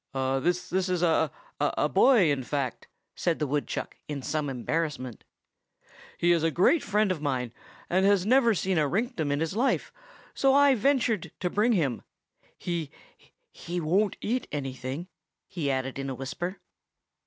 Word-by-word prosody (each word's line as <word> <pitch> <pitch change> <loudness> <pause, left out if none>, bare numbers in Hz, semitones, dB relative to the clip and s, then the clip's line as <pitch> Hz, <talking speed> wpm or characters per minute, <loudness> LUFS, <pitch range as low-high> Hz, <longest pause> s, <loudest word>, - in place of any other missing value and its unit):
"This 135 +7 0
is 185 -2 +1
a—a—a 155 -3 0
boy, 195 - +5
in 140 -2 0
fact," 135 -1 -3 0.3
said 170 -2 0
the 150 - -1
woodchuck 145 +1 -3
in 145 -3 -5
some 150 0 -1
embarrassment. 130 -2 -3 0.9
"He 175 - +3
is 170 -2 +3
a 165 - +2
great 190 - +3
friend 210 -1 +1
of 170 -5 -3
mine, 125 -5 -2 0.3
and 185 +2 +2
has 195 -2 +4
never 235 -1 +4
seen 185 -1 0
a 150 - +2
rinktum 210 - -1
in 145 - 0
his 165 +3 -2
life, 250 +5 0 0.4
so 270 0 +3
I 285 -1 +6
ventured 245 - +1
to 180 -1 -1
bring 225 +4 +3
him. 140 - 0 0.6
He—he 170 +1 -7
won't 190 +6 +1
eat 245 +3 -1
anything!" 135 +3 -4 0.4
he 165 -7 -3
added 135 0 -2
in 135 0 -3
a 130 - -4
whisper. 175 +9 -5
165 Hz, 150 wpm, -27 LUFS, 140-200 Hz, 0.9 s, I